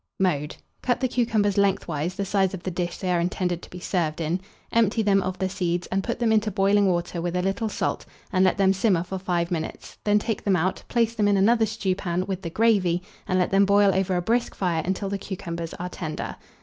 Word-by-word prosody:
Mode. 150 -6 0 0.3
Cut 245 -1 +1
the 260 - +1
cucumbers 220 -5 +1
lengthwise 180 -4 0
the 200 0 -2
size 195 -1 +1
of 180 - -10
the 185 - -2
dish 175 0 -3
they 185 -2 -2
are 175 - +2
intended 175 0 -1
to - - -12
be 180 - -9
served 170 -4 -1
in; 165 +3 -1 0.3
empty 225 -1 +3
them 200 -1 +3
of 185 0 -3
the 190 - 0
seeds, 180 -2 -1
and 195 +1 0
put 235 - -2
them 235 -2 +1
into 215 0 +3
boiling 200 0 +3
water 175 -1 -1
with 175 +1 -2
a 180 - +1
little 195 +4 -1
salt, - - -2 0.3
and 185 0 +4
let 185 - +3
them 195 -1 +4
simmer 190 -3 +2
for 190 +1 -5
5 175 -2 -1
minutes; 160 -2 -5
then 205 0 +3
take 220 +1 -2
them 195 -2 +3
out, 185 +2 0
place 230 -2 +1
them 210 -3 +1
in 200 -1 +3
another 225 +3 +4
stewpan, 185 -3 -1
with 190 -1 -3
the 170 - -4
gravy, 185 -4 +2 0.2
and 185 - +1
let 180 - +1
them 195 +1 +5
boil 200 0 +4
over 190 -1 +1
a 175 - 0
brisk 235 +5 0
fire 175 -4 0
until 190 +2 -2
the 200 0 -3
cucumbers 170 -4 -5
are 180 - -4
tender. 160 -4 -5
190 Hz, 230 wpm, -25 LUFS, 175-205 Hz, 0.3 s, them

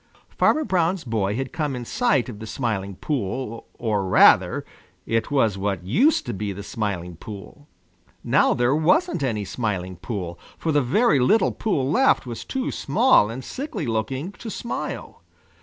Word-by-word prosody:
Farmer 310 - +3
Brown's 180 - 0
boy 105 -4 -1
had 135 +1 -4
come 150 -4 -2
in 120 -1 -5
sight 190 - +1
of 110 -5 -8
the 110 - -7
Smiling 105 -5 -3
Pool 120 -1 -3
or 105 -4 -1
rather, 95 - +5 0.4
it 115 0 0
was 115 -9 +1
what 95 -3 -2
used 250 - +3
to 120 - -3
be 100 +1 -3
the 100 +1 -7
Smiling 95 -6 -3
Pool. 110 - -10 0.6
Now - - +3
there 120 +2 +2
wasn't 180 - +2
any 110 -6 -1
Smiling 95 -5 -3
Pool, 90 -4 -5 0.2
for 160 - -1
the 145 -1 +3
very 145 - +3
little 210 - +3
pool 150 -12 -1
left 270 - +3
was 120 -2 -6
too 265 -1 -3
small 230 - +3
and 125 +3 -6
sickly 255 - -5
looking 130 - -2
to 225 - -9
smile. 235 - -5
120 Hz, 160 wpm, -23 LUFS, 105-160 Hz, 0.6 s, rather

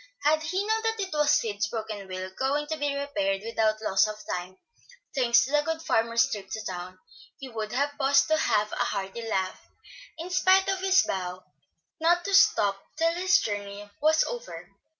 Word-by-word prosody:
Had 310 +1 +3
he 370 +6 -2
known 440 +1 +1
that 450 0 -1
it 385 -3 -3
was 300 -1 +2
Sid's 215 -1 +1
broken 215 -3 -5
wheel, 185 0 -6
going 280 +3 0
to 315 - -3
be 290 -1 -1
repaired 200 -9 -1
without 220 -1 0
loss 195 -1 +3
of 215 - -5 0.2
time, 180 +1 -7 0.6
thanks 235 -3 +4
to 270 - -7
the 295 0 +3
good 325 +1 -3
farmer's 230 -6 +2
trip 195 -2 -6
to 215 +2 -5
town, 185 0 -6 0.4
he 270 - -8
would 220 -2 -5
have 285 +3 -1
paused 275 0 +4
to 315 - +4
have 210 -8 +1
a - - -4
hearty 195 +3 -2
laugh, 190 -5 -2 0.6
in 335 +3 -7
spite 375 +1 +4
of 385 -1 0
his 375 -1 +4
vow 180 -1 -4 0.6
not 345 +2 +2
to 400 - -2
stop 200 - +4 0.2
till 330 +1 +2
his 360 +2 +3
journey 205 -1 -5
was 315 +1 +4
over. - - -7
245 Hz, 190 wpm, -27 LUFS, 205-320 Hz, 0.6 s, thanks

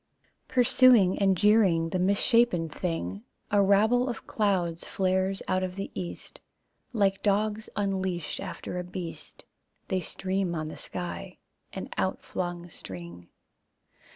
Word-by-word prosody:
Pursuing 245 -6 +5
and 195 -2 +3
jeering 190 -5 +4
the 185 - -1
misshapen 200 -1 +3
thing 110 - -3 0.3
A 205 0 +5
rabble 220 +6 +4
of 240 - -5
clouds 180 -6 0
flares 190 0 0
out 185 0 +1
of 185 -1 -3
the 195 0 -5
east. 175 - -6 0.5
Like 195 -4 +1
dogs 210 +1 0
unleashed 190 -4 -2
After 185 -1 -5
a - - -3
beast, 180 -1 -7 0.4
They 190 -1 0
stream 185 +1 -2
on 155 -1 -2
the 155 - -7
sky, 180 -1 -6 0.3
an - - -6
outflung 175 -1 -2
string. 85 - -8
190 Hz, 125 wpm, -28 LUFS, 175-205 Hz, 0.5 s, Pursuing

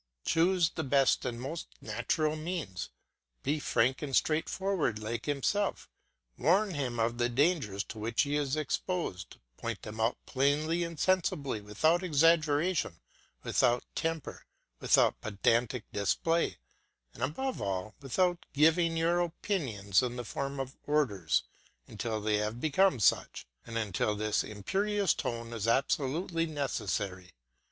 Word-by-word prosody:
Choose 170 0 +3
the 160 - -3
best 135 -1 +3
and 120 -2 -3
most 140 +7 -5
natural 120 +8 -1
means; 155 - -4 0.5
be 150 +2 0
frank 130 -1 +1
and 140 -3 -2
straightforward 160 - +1
like 110 +3 -4
himself; 170 +8 -1 0.5
warn 190 - +3
him 130 -5 -2
of 115 +1 0
the 120 0 +2
dangers 130 - +1
to 110 - -9
which 115 +4 +1
he 145 0 -1
is 145 -1 0
exposed, 155 - -3 0.2
point - - -4
them 110 +1 -7
out 115 +2 +1
plainly 150 +5 +1
and 170 -2 -6
sensibly, 150 - +1
without 155 - +2
exaggeration, 160 - +2 0.4
without 120 -1 +2
temper, 165 -1 -3 0.3
without - - +3
pedantic 115 +3 +1
display, 165 - +1 0.6
and - - -12
above 210 - -2
all 100 +1 -2
without 175 +6 +1
giving 165 +3 +4
your 170 +2 +2
opinions 135 - 0
in 125 -1 -2
the 120 -1 -5
form 140 +3 -4
of 135 0 -5
orders, 115 - +1 0.4
until 110 0 -3
they 105 0 +1
have 105 +3 -2
become 160 +2 +3
such, 100 - +2 0.2
and 115 0 -4
until 105 -1 0
this 105 0 0
imperious 195 - 0
tone 115 0 -4
is 110 -1 -2
absolutely 150 +7 +1
necessary. 100 - -3
140 Hz, 130 wpm, -31 LUFS, 110-165 Hz, 0.6 s, giving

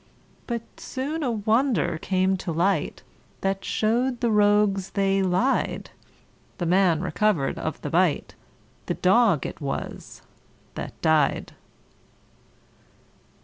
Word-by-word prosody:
But 235 -2 -3
soon 285 +5 -4
a 270 - 0
wonder 220 - +1
came 190 +1 +1
to 180 - -4
light, 170 0 0 0.4
That 195 0 -1
show'd 240 +3 0
the 235 -2 +1
rogues 205 -2 +3
they 195 -1 +1
lied: 190 +8 0 0.7
The 175 - -2
man 175 -2 +3
recover'd 185 -6 0
of - - -4
the - - -4
bite - - +1 0.5
The - - -1
dog 195 - +3
it - - -6
was 140 -1 -5 0.5
that - - -7
died. 155 -3 +2
195 Hz, 110 wpm, -25 LUFS, 180-230 Hz, 0.7 s, rogues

